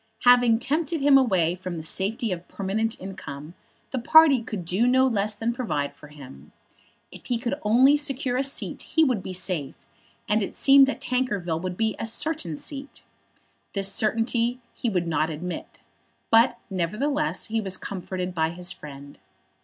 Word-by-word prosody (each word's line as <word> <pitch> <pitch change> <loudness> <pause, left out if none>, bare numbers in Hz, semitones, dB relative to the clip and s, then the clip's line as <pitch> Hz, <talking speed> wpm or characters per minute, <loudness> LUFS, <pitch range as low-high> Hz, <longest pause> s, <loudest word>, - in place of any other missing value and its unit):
Having 245 -2 +6
tempted 305 +6 -1
him 280 0 +5
away 190 -11 +3
from 180 -1 -6
the 160 - -6
safety 205 +7 -2
of 180 -1 -5
permanent 215 +3 -2
income, 160 -5 -8 0.4
the 260 - -2
party 285 +1 +6
could 215 -4 -5
not - - -11
do 240 +9 +3
less 215 -4 0
than 230 +3 -2
provide 155 - -2
for 150 - -14
him. 130 - -13 0.6
If - - -13
he 245 - 0
could 235 +2 -3
only 250 +7 +5
secure 275 -3 -1
a 255 - +2
seat 275 - -3
he 320 - +1
would 250 -9 +1
be 185 - -7
safe; 180 -6 -3 0.5
and 215 +1 +2
it 200 - -4
seemed 275 0 +6
that 275 - -3
Tankerville 205 -11 -1
would 180 0 -4
be 220 -2 0
a 225 - -3
certain 230 - -2
seat. 280 - -8 0.7
This 195 -1 +2
certainty 230 +2 0
he 240 - -2
would 180 -4 -1
not 160 -1 0
admit; 170 +3 -7 0.5
but, 230 +2 +5
nevertheless, 220 - -1
he 225 0 0
was 190 -2 -3
comforted 185 -1 -5
by 160 -2 0
his 175 +2 -5
friend. 140 -3 -11
215 Hz, 170 wpm, -25 LUFS, 180-250 Hz, 0.7 s, Having